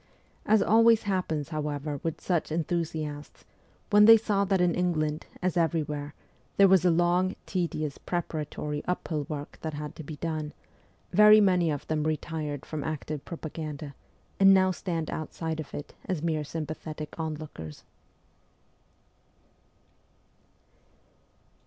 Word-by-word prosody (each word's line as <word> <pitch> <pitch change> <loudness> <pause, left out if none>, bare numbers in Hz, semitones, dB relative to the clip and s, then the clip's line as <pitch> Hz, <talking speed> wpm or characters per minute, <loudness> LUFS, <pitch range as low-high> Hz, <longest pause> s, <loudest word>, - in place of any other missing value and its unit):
As 220 0 +5
always 230 0 +5
happens 180 -7 -1
however 150 -2 -3
with 165 -1 -3
such 170 -4 -1
enthusiasts, 155 -2 -3 0.5
when 210 0 +7
they 225 +1 +10
saw 210 -2 +1
that 195 -1 +1
in 180 -1 +3
England, 155 -4 -1 0.2
as 185 -1 +1
everywhere, 150 -3 -1 0.4
there 200 - +7
was 190 -2 +5
a 180 - +5
long, 175 +2 +2
tedious, 160 -5 -2
pre 175 -1 -1
paratory, 150 -2 -4
uphill 155 -5 -2
work 145 -2 -6
that 160 -2 -4
had 150 0 -6
to 160 - -7
be 150 +1 -7
done, 155 -1 -4 0.6
very 210 0 +8
many 180 -5 +3
of 145 -2 -3
them 155 -1 -1
retired 155 -2 -3
from 155 -2 -4
active 155 -1 -4
propaganda, 155 -3 -6 0.5
and 195 0 +8
now 185 0 +4
stand 170 -4 -3
outside 160 +1 -4
of 155 - -6
it 145 - -7
as 180 -5 -2
mere 160 -2 0
sympathetic 155 0 -6
onlookers. 150 - -6
160 Hz, 130 wpm, -28 LUFS, 150-180 Hz, 0.6 s, they